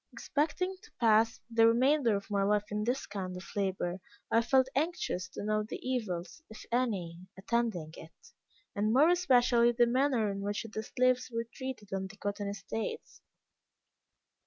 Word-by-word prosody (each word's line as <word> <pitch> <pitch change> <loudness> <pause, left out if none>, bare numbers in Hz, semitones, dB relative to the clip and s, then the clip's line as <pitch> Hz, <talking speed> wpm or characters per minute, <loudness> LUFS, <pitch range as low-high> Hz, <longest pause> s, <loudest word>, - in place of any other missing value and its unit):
Expecting 320 +6 -1
to - - -17
pass 225 -1 +3
the 225 0 +5
remainder 250 0 +3
of 200 +1 -5
my 200 -1 +1
life 205 +1 +1
in 210 0 -1
this 245 +4 -1
kind 185 -3 -5
of 180 - -9
labor, 190 -2 -1 0.3
I 230 - +5
felt 260 +2 +3
anxious 285 - -1
to 185 - -7
know 215 0 +1
the 210 - -5
evils, 210 - -3
if 220 - -11
any, 200 -9 -1 0.2
attending 190 -6 -1
it, 160 - -14 0.4
and 210 +1 +1
more 290 +6 +6
especially 245 -9 +4
the 240 0 +4
manner 245 -3 +2
in 195 0 -5
which 205 +2 -2
the 220 -1 -5
slaves 255 +3 +1
were 230 0 -2
treated 260 -7 -6
on 190 0 -2
the 200 +2 -14
cotton 205 0 -3
estates. 200 +2 -5
220 Hz, 160 wpm, -31 LUFS, 200-250 Hz, 0.4 s, more